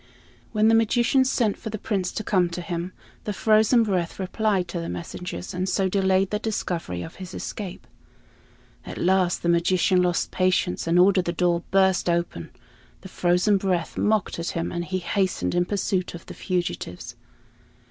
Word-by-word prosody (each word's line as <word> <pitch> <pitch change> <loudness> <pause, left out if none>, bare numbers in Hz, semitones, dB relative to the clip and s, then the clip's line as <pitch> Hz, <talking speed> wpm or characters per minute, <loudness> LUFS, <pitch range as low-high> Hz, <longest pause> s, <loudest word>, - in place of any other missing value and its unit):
When 215 -1 +3
the 225 - +5
magician 235 +4 +3
sent 240 -5 +1
for 220 - -6
the 215 - -4
Prince 195 -3 -2
to 215 - -3
come 185 -4 +2
to 175 +1 -5
him, 175 +1 -4 0.3
the 210 - -2
frozen 220 +3 +4
breath 185 -5 -1
replied 195 -1 0
to 175 - -3
the 165 - -4
messengers, 180 +1 -6
and 185 +1 -2
so 190 0 +1
delayed 190 0 +2
the 210 - 0
discovery 170 - -3
of 165 - -10
his 185 -1 -8
escape. 190 -4 -6 1.0
At - - -8
last 185 -1 +1
the - - 0
magician 180 +2 +3
lost 175 -1 0
patience 185 -2 0
and 170 +1 +3
ordered 185 0 +4
the 170 - 0
door 175 0 +1
burst 190 -2 +3
open. 170 - -2 0.5
The 190 - -10
frozen 180 +4 +2
breath 185 -3 -1
mocked 215 -5 0
at 170 - -2
him, 165 - -2
and 175 0 -3
he 185 +2 -2
hastened 185 +1 -1
in 175 0 +2
pursuit 190 -2 -1
of 170 - -10
the - - -9
fugitives. 120 - -4
185 Hz, 175 wpm, -24 LUFS, 175-200 Hz, 1.0 s, the